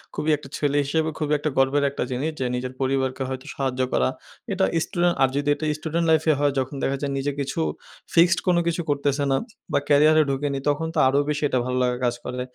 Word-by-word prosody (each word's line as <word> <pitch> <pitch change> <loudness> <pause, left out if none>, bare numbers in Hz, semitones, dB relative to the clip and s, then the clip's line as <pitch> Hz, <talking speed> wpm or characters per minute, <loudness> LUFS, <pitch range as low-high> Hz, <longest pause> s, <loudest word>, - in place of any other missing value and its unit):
খুবই 155 - -1
একটা 135 - -13
ছেলে 145 -1 +1
হিসেবে 160 +3 0
খুবই 150 -1 -1 0.3
গর্বের 135 +2 +3
একটা 140 - -3
জিনিস, 140 +6 -1
যে, 130 - -1
নিজের 125 +1 -4
পরিবারকে 130 0 0
হয়তো 130 +1 -5
সাহায্য 130 -2 -1
করা। 65 - +2 0.4
এটা - - +2 0.2
স্টুডেন্ট 175 -2 +1
আর 135 - +5
যদি 145 +1 0
এটা 155 - -5
স্টুডেন্ট 165 +2 -1
লাইফ 160 -1 +4
এ - - +4
হয়, 145 -1 +3
যখন 130 +2 -3
দেখা 135 - 0
যায় 140 - -2
নিজে 140 +1 -1
কিছু 135 -1 -3 0.5
ফিক্সড 170 +2 +5
কোন 180 -1 +4
কিছু 170 +1 0
করতেছেনা 140 -1 +1 0.4
বা - - +3
ক্যারিয়ারে 155 +2 +6
ঢুকেনি, 140 0 -1
তখন 150 +3 0
তো - - +2
আরো 135 +2 +3
বেশি 150 0 -1
এটা 130 - +1
ভালো 125 0 -1
লাগার 125 0 0
কাজ 120 0 +1
করে। 125 0 -4
140 Hz, 210 wpm, -24 LUFS, 130-155 Hz, 0.5 s, ক্যারিয়ারে